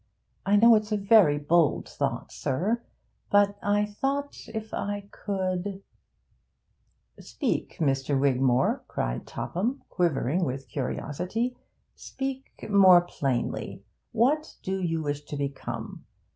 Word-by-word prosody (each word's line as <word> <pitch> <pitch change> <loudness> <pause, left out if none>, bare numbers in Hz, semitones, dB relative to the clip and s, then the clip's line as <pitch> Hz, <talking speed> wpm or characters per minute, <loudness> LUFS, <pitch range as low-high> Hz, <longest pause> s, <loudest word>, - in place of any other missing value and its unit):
I 200 - +4
know 230 +3 +7
it's 215 0 +2
a 210 - +2
very 200 -7 +5
bold 155 +2 +2
thought, - - -3
sir, 195 - -1 0.5
but 205 0 +3
if 220 +2 -2
I 205 0 -4
could 190 0 -3 0.7
' - - -33
'Speak, - - -3
Mr. 135 -2 +1
Wigmore,' 130 -2 +2
cried - - -3
Topham, 235 +10 -3
quivering 170 -1 +1
with 135 -2 -3
curiosity, 180 - -3 0.4
'speak 270 0 -6
more 190 -4 +7
plainly. 135 -8 -3 0.3
What 295 +7 +1
do 190 0 -2
you 165 -3 -1
wish 145 -1 -2
to 145 - -6
become? 140 -1 -5
185 Hz, 110 wpm, -27 LUFS, 145-215 Hz, 0.7 s, know